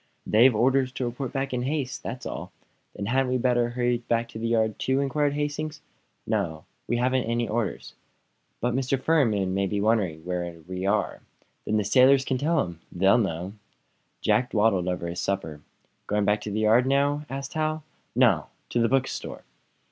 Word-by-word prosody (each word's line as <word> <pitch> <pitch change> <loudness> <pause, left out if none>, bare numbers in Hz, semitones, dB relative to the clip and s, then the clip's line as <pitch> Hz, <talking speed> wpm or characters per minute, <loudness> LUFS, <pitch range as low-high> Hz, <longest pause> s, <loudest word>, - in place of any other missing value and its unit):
"They've 120 +3 +5
orders 130 +3 +2
to 130 - -2
report 120 +2 -4
back 135 -1 -2
in 125 - -1
haste. 135 -1 -2
That's 125 +2 -6
all." - - -6 0.4
"Then 100 - -4
hadn't 130 +3 +1
we - - +2
better 120 -1 +2
hurry 120 0 0
back 115 0 -1
to 110 - -8
the 115 - -2
yard, 110 -2 +1
too?" 130 +1 +1
inquired 140 +1 +1
Hastings. 150 +1 -3 0.5
"No; 80 -2 -2 0.2
we 120 - 0
haven't 130 +1 +1
any 115 +1 0
orders." 110 -1 -3 0.7
"But 120 0 0
Mr. 130 +1 0
Farnum 115 -12 +2
may 100 0 +1
be 100 +2 -1
wondering 100 -7 +1
where 90 -1 -3
we 95 +1 -3
are." 105 +1 0 0.4
"Then 110 - +1
the 105 - +1
sailors 130 +6 +5
can 130 - -1
tell 160 +4 +2
him; 85 -2 -8
they 90 +2 -1
know." 95 -4 -1 0.7
Jack 125 0 +2
dawdled 105 -5 +2
over 90 -1 -2
his 85 +1 -4
supper. 80 -7 -3 0.5
"Going 105 0 +1
back 105 +1 +2
to - - -5
the 110 +2 -1
yard 115 +4 +4
now?" 140 +2 +2
asked 135 0 -5
Hal. 155 0 -1 0.3
"No; 115 - +4 0.2
to 120 - 0
the 115 - +3
bookstore." 135 0 -2
120 Hz, 180 wpm, -26 LUFS, 100-135 Hz, 0.7 s, They've